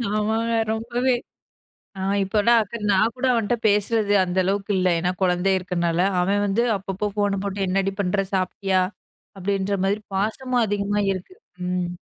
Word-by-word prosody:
ஆமாங்க, 220 Hz, +2 st, 0 dB, 0.2 s
ரொம்பவே. 240 Hz, +3 st, 0 dB, 0.8 s
அ, -, -, -6 dB, 0.2 s
இப்போலாம் 220 Hz, +4 st, +3 dB, 0.3 s
நான் 215 Hz, +4 st, +3 dB
கூட 255 Hz, -, -2 dB
அவன்ட்ட 230 Hz, 0 st, +1 dB
பேசுறது 210 Hz, 0 st, +2 dB
அந்த 180 Hz, 0 st, -3 dB
அளவுக்கு 200 Hz, +2 st, -1 dB
இல்ல. 185 Hz, 0 st, +2 dB
ஏன்னா 180 Hz, +2 st, 0 dB
குழந்தை 180 Hz, +1 st, +2 dB
இருக்குறனால 175 Hz, -2 st, -1 dB, 0.2 s
அவன் 200 Hz, +3 st, +1 dB
வந்து 205 Hz, +4 st, +1 dB
அப்பப்போ 195 Hz, +2 st, -3 dB
ஃபோன 205 Hz, -1 st, +1 dB
போட்டு, 200 Hz, 0 st, -3 dB
"என்னடி 195 Hz, +1 st, 0 dB
பண்ற 195 Hz, +1 st, 0 dB
சாப்டியா?" 190 Hz, 0 st, +1 dB, 0.6 s
அப்டின்ற 195 Hz, +1 st, -1 dB
மாரி, 200 Hz, +2 st, +1 dB, 0.2 s
பாசமும் 240 Hz, +5 st, 0 dB
அதிகமா 205 Hz, 0 st, 0 dB
இருக்கு. 185 Hz, -, -8 dB, 0.3 s
ம். 180 Hz, -1 st, -1 dB
200 Hz, 140 wpm, -23 LUFS, 190-215 Hz, 0.8 s, இப்போலாம்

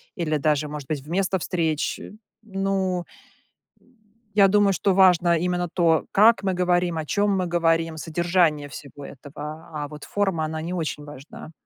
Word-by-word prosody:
или 155 Hz, -3 st, -1 dB
даже, 150 Hz, 0 st, +1 dB
может 150 Hz, -3 st, -7 dB
быть, 150 Hz, -3 st, -3 dB
вместо 190 Hz, +5 st, -1 dB
встреч. 160 Hz, -3 st, -1 dB, 0.4 s
Ну, 195 Hz, -3 st, -1 dB, 0.8 s
э, -, -, -32 dB, 0.5 s
я 200 Hz, -1 st, +6 dB
думаю, 200 Hz, 0 st, +3 dB
что 190 Hz, +2 st, +1 dB
важно 180 Hz, -3 st, +5 dB
именно 175 Hz, +1 st, -1 dB
то, 165 Hz, -3 st, +2 dB
как 215 Hz, 0 st, +5 dB
мы 190 Hz, -1 st, 0 dB
говорим, 175 Hz, -1 st, +1 dB
о 155 Hz, -, -3 dB
чём 205 Hz, +3 st, +1 dB
мы 185 Hz, -, 0 dB
говорим, 165 Hz, -1 st, +1 dB
содержание 165 Hz, -2 st, +1 dB
всего 140 Hz, +1 st, -10 dB
этого. 150 Hz, +4 st, -9 dB
А 150 Hz, -1 st, -4 dB
вот 150 Hz, 0 st, -11 dB
форма, 195 Hz, -6 st, -1 dB
она 160 Hz, 0 st, -4 dB
не 170 Hz, +3 st, -4 dB
очень 155 Hz, -4 st, -3 dB
важна. 145 Hz, +2 st, -11 dB
170 Hz, 160 wpm, -24 LUFS, 155-185 Hz, 0.8 s, я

